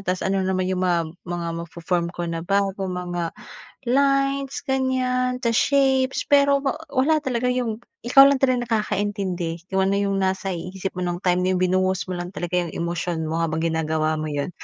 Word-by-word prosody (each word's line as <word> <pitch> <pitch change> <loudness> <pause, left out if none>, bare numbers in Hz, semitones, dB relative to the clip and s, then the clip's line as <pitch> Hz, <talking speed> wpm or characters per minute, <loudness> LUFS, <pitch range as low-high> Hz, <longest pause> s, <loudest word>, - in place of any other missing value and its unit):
Tas 185 -1 -2
ano 195 0 +1
naman 185 0 0
yung 185 -1 -1
mga 170 -2 +1 0.2
mga 175 -1 -3 0.2
mafo-form 170 +1 -2
ko 175 - -4
na 165 - -3
bago 195 +1 0
mga 175 -2 -3 0.5
lines 275 +1 +2
ganyan 255 -1 0
sa 235 -2 0
shapes. 265 0 +2
Pero 280 0 +5
wa 275 +2 -1 0.2
wala 295 +3 +2
talaga 250 -3 -1
yung 245 -3 -1 0.2
ikaw 275 +3 +8
lang 275 -1 +2
talaga 250 -2 +2 0.2
nakakaintindi 190 -5 -2
kung 190 0 +2
ano 195 - +1
yung 200 -1 0
nasa 190 0 0
i 180 +1 -5
isip 190 0 -3
mo 180 - -1
nung 175 +1 -3
time 180 -1 +2
na 185 - +2
yung 180 - 0
binuhos 185 0 +1
mo 180 - -3
lang 175 +2 -6
talaga 175 0 -1
yung 175 -2 -3
emosyon 170 -1 -2
mo 165 - -1
habang 160 -1 -1
ginagawa 160 -1 0
mo 155 - -3
yun. 145 +1 -2
190 Hz, 190 wpm, -23 LUFS, 175-250 Hz, 0.5 s, ikaw